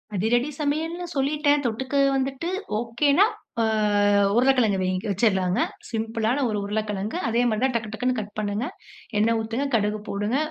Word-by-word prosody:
அதிரடி 240 +8 +1
சமையல்ன்னு 320 +4 -1
சொல்லிட்டேன், 290 +1 +2
தொட்டுக்க 260 +4 -2 0.2
வந்துட்டு, 270 +5 -2 0.3
ஓகேனா 280 - +3 0.4
ஆ - - +3 0.7
உருளைக்கிழங்கு 245 -5 +3
வைங்க 185 +1 -1
வேகவச்சிடலாங்க, 190 0 +1 0.3
சிம்பிளான 225 +3 -1
ஒரு 210 - -1
உருளைக்கிழங்கு. 210 - -2
அதே 230 +1 +2
மாதிரி 215 0 0
தான் 265 -1 +2
டக்கு 220 -2 -2
டக்குனு 250 +3 0
கட் 210 -1 -7
பண்ணுங்க, 210 +3 -2 0.5
எண்ணெய் 225 +2 +3
ஊத்துங்க, 230 +5 -2
கடுகு 210 -1 0
போடுங்க, 205 +6 -1
230 Hz, 135 wpm, -24 LUFS, 210-270 Hz, 0.7 s, ஓகேனா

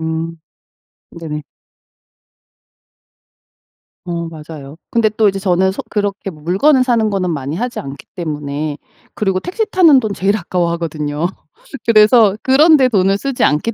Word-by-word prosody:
음. 160 +1 -4 0.7
네네. 155 -3 -6 2.6
어 170 -1 -4
맞아요. 155 -3 -10
근데 230 -2 +2
또 215 0 +2
이제 195 0 -2
저는 190 0 +1
소 - - -6
그렇게 205 -1 -2
뭐 155 -4 -15
물건을 255 - +3
사는 230 -4 +1
거는 190 -3 -1
많이 145 -1 -4
하지 245 +5 -3
않기 140 0 -9
때문에 150 -3 -4 0.4
그리고 190 -3 -1
택시 415 - -2
타는 345 -9 +5
돈 220 -4 -3
제일 195 +2 +1
아까워하거든요. 170 -4 -2 0.6
그래서 215 -2 +5
그런 300 +5 +5
데 260 -3 +3
돈을 195 -3 +2
쓰지 275 +3 -2
않기 155 +10 0
190 Hz, 280 characters per minute, -16 LUFS, 160-220 Hz, 2.6 s, 타는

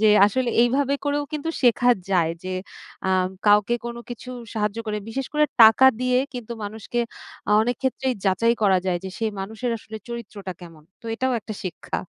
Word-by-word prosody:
যে, 215 - +5 0.2
আসলে 245 +4 0
এইভাবে 270 +3 +2
করেও 290 0 0
কিন্তু 305 +1 -3
শেখা 245 0 +4 0.2
যায় 170 -3 +2
যে, 185 0 -3 0.5
আম 185 -1 +2 0.2
কাউকে 210 +3 +5
কোনো 235 0 -6
কিছু 245 +1 -7 0.2
সাহায্য 210 0 -1
করে 210 0 -1
বিশেষ 265 +3 -3
করে 300 0 +4 0.2
টাকা 225 +4 +8
দিয়ে 255 0 +2 0.2
কিন্তু 240 -2 -6
মানুষকে 220 +3 -3 0.5
আ - - +1
অনেকক্ষেত্রেই 255 +2 -1
যাচাই 215 +5 +3
করা 190 -2 +5
যায় 175 -1 +1
যে, - - -3
সে 225 - -1 0.2
মানুষের 220 +5 -3
আসলে 220 +1 -9
চরিত্রটা 210 -5 -6
কেমন? 165 -3 -12 0.2
তো - - -31
এটাও 260 +2 0
একটা 215 0 -7
শিক্ষা। 185 -2 -4
225 Hz, 175 wpm, -23 LUFS, 200-250 Hz, 0.5 s, টাকা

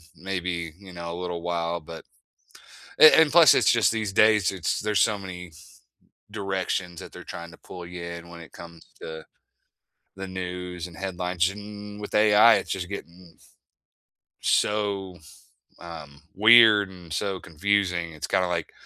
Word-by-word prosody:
maybe, 90 -3 -4
you 95 -2 -13
know, 85 -1 -7
a 85 - -6
little 90 -1 -5
while 85 0 -2
but 80 +1 -11 1.0
eh, 155 - +10
and, 150 - +1
plus, 165 -5 +7
it's - - +3
just 115 -2 +3
these 110 -3 -3
days, 105 -2 +4
it's 90 -4 -2
there's 105 -1 0
so 105 -2 +2
many 90 -3 -9 0.8
directions 95 -4 -3
that - - -11
they're - - -11
trying 85 0 -9
to - - -16
pull 90 -2 -10
you 90 0 -8
in 85 0 -8
when 85 -1 -12
it 80 - -13
comes 85 -1 -13 0.2
to 80 0 -8 0.9
the 95 0 -6
news 90 -1 -6
and 85 -2 -13
headlines, 90 -1 -1
and 105 0 -10
with 105 - -8
AI, 105 +2 +6
it's - - -4
just 90 -3 -3
getting 90 -4 -10 1.1
so, 100 -3 0 0.6
um, 75 -5 -11
weird 110 -1 +6
and 90 -4 -14
so 95 +1 -2
confusing. 85 0 -1
It's 75 - -6
kinda 90 0 +1
like 85 -2 -3
90 Hz, 155 wpm, -25 LUFS, 85-100 Hz, 1.1 s, eh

